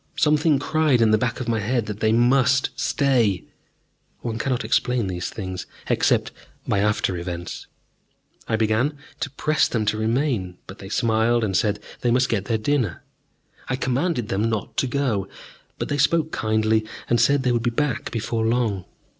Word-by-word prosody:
Something 150 0 +3
cried 155 -2 +2
in 115 -2 +4
the 110 - +5
back 120 -2 -1
of 130 - -4
my 115 -1 +1
head 115 +2 0
that 105 -1 -6
they 110 -1 +2
must 130 +3 +3
stay 120 -9 +1 0.8
one 115 -1 -3
cannot 125 -4 -1
explain 125 0 +1
these 90 -1 -3
things, 95 -3 -6 0.2
except - - +2 0.4
by 100 - +1
after 105 -3 +1
events. 85 0 -6 0.8
I 110 - +1
began 110 +7 +1 0.2
to - - -2
press 150 +3 +1
them 110 -3 -1
to 105 +1 0
remain, 110 -6 0
but 95 - -11
they 95 - -9
smiled 115 +2 +2
and 95 -3 -1
said 105 +2 +1 0.2
they 120 - 0
must 125 +2 +3
get 100 -4 0
their 115 0 0
dinner. 115 - -1 0.7
I 130 - +1
commanded 130 -1 -1
them 105 +4 0
not 110 -2 -3
to 135 - +2
go; 125 -7 -1 0.5
but - - -3
they 145 - -2
spoke 160 +2 +2
kindly 110 0 +1 0.2
and 120 -1 +3
said 140 +2 +3
they 125 - +2
would 120 -1 +1
be 120 - +1
back 135 0 -1
before 115 0 -2
long. 110 -5 0
115 Hz, 175 wpm, -23 LUFS, 110-130 Hz, 0.8 s, the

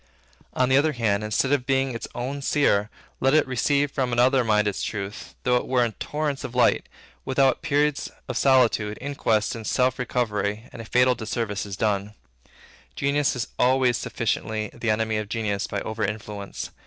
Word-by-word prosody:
On 130 - +2
the 130 - +5
other 155 +2 +3
part, 110 -4 +1
instead 105 +5 0
of 135 -3 +1
being 135 -1 +1
its 115 - -5
own 135 +4 -3
seer, 105 -8 +2 0.3
let 135 +3 +3
it 155 - +4
receive 140 +3 +1
from 130 -3 -1
another 125 +2 +4
mind 105 -2 +2
its 100 - -2
truth, 100 -1 -5
though 125 -1 +3
it - - -3
were 125 -2 +3
in 115 - -2
torrents 150 -2 -2
of 125 - -6
light, 125 - +3 0.3
without 135 0 +2
periods 145 0 +1 0.2
of - - -4
solitude, 120 -6 +3
inquest, 125 -6 0
and 115 -2 -6
self 130 0 +1
recovery, 105 -4 -1
and 115 - -7
a - - -9
fatal 125 +2 +4
disservice 110 -3 -3
is 100 -1 -6
done. 105 0 -1 0.8
Genius 140 - +1
is 125 - -3
always 125 -1 +3
sufficiently 110 -1 -2
the 115 -1 -3
enemy 110 0 +1
of 105 -1 -4
genius 105 -3 -1
by 100 -2 -3
over 110 0 -3
influence. 105 -1 -5
120 Hz, 180 wpm, -25 LUFS, 105-135 Hz, 0.8 s, the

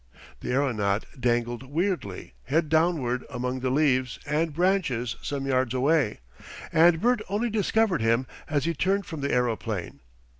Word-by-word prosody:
The - - -6
aeronaut 110 -7 +1
dangled 120 -1 0
weirdly 140 - -3
head 155 +1 +1
downward 155 -6 +1
among 125 -1 -3
the 130 0 -1
leaves 130 -2 +2
and 155 +2 0
branches 150 -9 0
some 140 -1 -3
yards 130 -2 +1
away, 135 - +2 0.5
and 165 0 +5
Bert 245 +2 +2
only 215 +4 0
discovered 215 - +1
him 115 +3 +2 0.2
as 145 -2 0
he 170 - +1
turned 195 +5 0
from 160 -4 -6
the 140 - -1
aeroplane. 110 - -1
140 Hz, 145 wpm, -26 LUFS, 125-170 Hz, 0.5 s, and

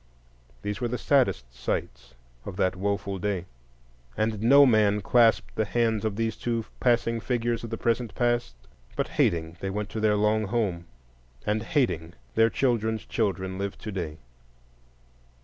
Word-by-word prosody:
These 105 -1 -3
were 120 - +1
the 125 +1 -2
saddest 120 - +1
sights - - -4 0.3
of - - -7
that 95 0 +1
woful 100 0 -2
day; 95 -2 -2 0.7
and 110 -1 0
no 140 +5 +7
man 105 -4 +3
clasped 115 +2 +3
the 110 - 0
hands 110 +1 0
of 110 -2 -1
these 115 -1 -1
two 115 -1 -2
passing 115 -1 +2
figures 120 0 -1
of 115 - -5
the 115 - -3
present 115 0 -1
past; 120 - 0 0.4
but, - - -1
hating, 80 0 0
they 95 - -3
went 105 +1 -3
to 110 - -4
their 105 -1 +3
long 105 +1 +2
home, 95 -6 -1 0.6
and, 105 +1 0
hating, 90 - 0 0.2
their 115 0 +4
children's 110 -4 0
children 95 -3 -2
live 100 0 -3
today. 90 -8 -5
110 Hz, 150 wpm, -27 LUFS, 95-115 Hz, 0.7 s, no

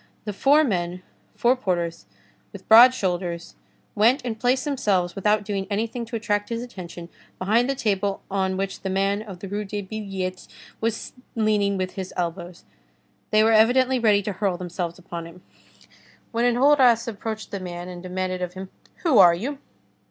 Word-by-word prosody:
The 210 - -3
four 285 +9 +4
men, 180 - -2 0.3
four 245 +2 +3
porters 170 - -2 0.4
with - - -12
broad 235 +3 +9
shoulders, 175 -4 -3 0.4
went 230 +6 +3
and 225 -2 -4
placed 255 +3 +1
themselves 200 -11 0
without 210 +1 +1
doing 195 -2 -3
anything 225 +3 -2
to 230 - -7
attract 205 -1 -1
his 230 0 -3
attention, 175 -7 -9 0.3
behind 225 +7 +2
the 275 - 0
table 200 -4 -1
on 190 -1 0
which 195 0 -3
the 190 - -3
man 195 +2 0
of 195 -5 -10
the 195 - -6
Rue 205 +2 -3
des 205 0 -5
Billettes 190 -3 -5 0.3
was 225 -1 -2 0.2
leaning 210 -3 +1
with 185 0 -2
his 190 -1 -7
elbows. 175 0 -4 0.6
They 215 0 +4
were 225 - +4
evidently 250 +4 +4
ready 210 -3 +3
to 205 - -2
hurl 190 -2 -1
themselves 175 -1 -4
upon 170 -2 -7
him. 175 +2 -15 0.9
Then 235 +1 +2
Enjolras 250 -3 +4
approached 220 0 -5
the 200 - -4
man 175 -1 -6
and 180 -1 -8
demanded 185 0 -3
of 180 0 -4
him:— 190 0 -8 0.3
"Who 300 - +4
are 175 -3 +8
you?" 270 +10 -4
200 Hz, 170 wpm, -24 LUFS, 185-230 Hz, 0.9 s, broad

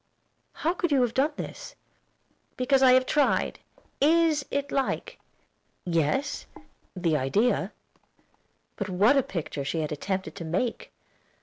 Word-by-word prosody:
"How 330 +3 -1
could 360 -4 -2
you 270 -3 +4
have 235 -2 -1
done 290 +4 +1
this?" - - -7 0.8
"Because 265 +1 +2
I 255 -1 +7
have 255 0 +4
tried. 295 +1 +1 0.4
Is 315 0 +4
it 280 0 -2
like?" 270 -1 -2 0.7
"Yes, 175 - 0 0.5
the 170 -4 +1
idea." 200 - +1 1.1
But 200 -1 -3
what 200 +9 +4
a 275 - +5
picture 160 - -5
she 160 +4 -2
had 155 - -3
attempted 190 +5 -3
to 175 - -5
make! 185 +9 -2
250 Hz, 130 wpm, -27 LUFS, 175-280 Hz, 1.1 s, I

